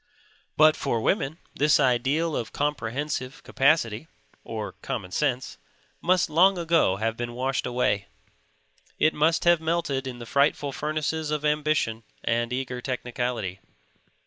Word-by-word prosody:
But 155 0 +6
for 120 -5 -1
women 145 - 0 0.2
this 150 +1 +3
ideal 135 +5 +2
of 115 - -3
comprehensive 145 0 -3
capacity 135 -3 +1 0.4
(or - - -5
common 90 - -4
sense) 130 +1 -1 0.4
must 180 0 +3
long 180 +5 +4
ago 165 - +2
have 110 +3 -1
been 120 0 -4
washed 130 +2 -1
away. 120 -5 0 0.9
It 155 - +3
must 160 +2 +2
have 175 -2 +4
melted 160 -5 -1
in 125 -2 -6
the 120 - -8
frightful 140 +2 +1
furnaces 155 +2 -2
of 150 0 -2
ambition 150 -7 +1 0.2
and 120 +1 0
eager 125 -1 -3
technicality. 120 -6 -3
140 Hz, 130 wpm, -26 LUFS, 120-155 Hz, 0.9 s, But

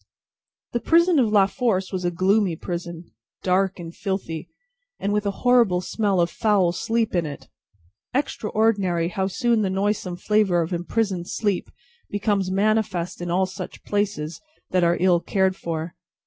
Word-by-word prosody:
The 240 - 0
prison 335 +3 +4
of 235 -4 +3
La 205 -2 +6
Force 195 -3 -1
was 185 -1 -2
a 175 - +2
gloomy 185 +1 +2
prison, 170 0 -6 0.3
dark 190 +1 +1
and 170 -2 -8
filthy, 185 -5 -4 0.5
and 200 +1 -1
with 210 0 0
a 200 - -4
horrible 235 -8 +5
smell 200 0 0
of 170 0 +2
foul 205 -6 +2
sleep 225 +6 -1
in 170 -3 +1
it. 140 - -9 0.6
Extraordinary 210 -9 0
how 190 +1 -1
soon 235 +3 +1
the 195 - 0
noisome 195 -1 -1
flavour 195 -3 +2
of 165 +3 -5
imprisoned 180 0 -1
sleep, 205 -4 -1 0.4
becomes 205 -2 0
manifest 200 -3 0
in 175 - -4
all 185 +2 +2
such 185 -1 -8
places 205 -6 -2 0.3
that 185 -1 +2
are 170 0 +3
ill 180 -1 +4
cared 190 +1 +1
for! 165 -2 -4
190 Hz, 155 wpm, -23 LUFS, 175-210 Hz, 0.6 s, La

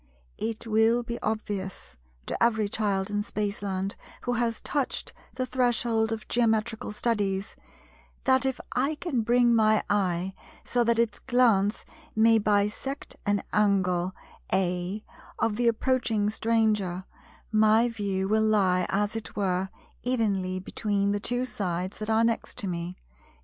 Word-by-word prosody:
It 225 +1 -3
will 225 +2 +3
be 235 0 -5
obvious, 195 - -4 0.3
to - - -3
every 220 -3 +3
child 200 -2 -1
in 205 0 0
Spaceland 200 -2 -2 0.3
who 245 - 0
has 235 -1 0
touched 285 -3 -2 0.2
the 255 - -1
threshold 240 -3 +1
of 220 -1 -4
Geometrical 225 -1 +1
Studies, 205 -3 -1 0.7
that, 260 0 +4
if 265 -1 0
I 275 +5 0
can 295 -6 -1
bring 240 +1 +4
my 215 -1 +4
eye 190 -2 0 0.3
so 245 -1 +1
that 235 0 +3
its 235 -1 +1
glance 230 -5 +2 0.3
may 225 +1 +5
bisect 210 +6 -1
an 205 -1 +1
angle 190 -3 +2 0.4
(A) 185 +2 0 0.3
of 220 - +1
the 240 +1 +1
approaching 230 -3 +1
stranger, 215 -5 +1 0.5
my 220 +2 +5
view 200 -4 -2
will 215 +2 +2
lie 195 -4 +3
as 205 +3 0
it 225 - -6
were 190 -2 0 0.3
evenly 200 -7 0
between 200 +1 -1
the 205 - 0
two 245 +4 -1
sides 185 -5 -3
that 215 0 -4
are 220 +1 +3
next 230 0 -1
to 215 -6 -3
me 175 0 -4
(viz. - - -34
215 Hz, 140 wpm, -27 LUFS, 195-235 Hz, 0.7 s, may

